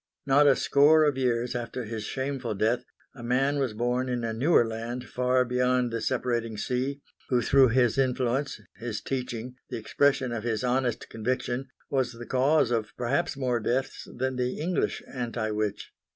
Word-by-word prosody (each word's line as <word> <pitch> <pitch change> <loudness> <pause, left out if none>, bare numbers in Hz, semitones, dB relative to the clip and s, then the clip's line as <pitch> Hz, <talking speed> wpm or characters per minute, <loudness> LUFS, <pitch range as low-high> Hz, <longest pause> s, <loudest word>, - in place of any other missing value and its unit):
Not 145 +1 +5
a 135 - +6
score 150 +4 +5
of 145 -3 +2
years 125 -2 0
after 120 +1 -4
his 110 0 -5
shameful 130 -3 -3
death, 110 +5 +1 0.3
a 130 - -11
man 135 +4 +1
was 130 -5 0
born 125 +3 0
in 120 -1 -2
a 115 -1 -2
newer 125 +2 +4
land 115 +2 -5
far 125 0 +1
beyond 125 0 +1
the 115 0 -2
separating 120 -3 -1
sea, 130 +5 -2 0.3
who 125 - +3
through 135 -1 +6
his 120 0 +2
influence, 130 +1 0 0.2
his 110 -1 -4
teaching, 125 -1 -4
the - - -4
expression 135 +3 +1
of 115 -2 -3
his 115 -2 -1
honest 125 -1 0
conviction, 125 +3 -2 0.2
was 130 -2 0
the 120 +1 -9
cause 130 0 +2
of 115 -3 -1
perhaps 140 +5 0
more 125 -3 0
deaths 130 +4 -2
than 130 +1 -2
the 125 0 -1
English 175 +4 -1
anti 120 -3 -3
witch. 105 -1 -3
125 Hz, 170 wpm, -27 LUFS, 115-135 Hz, 0.3 s, a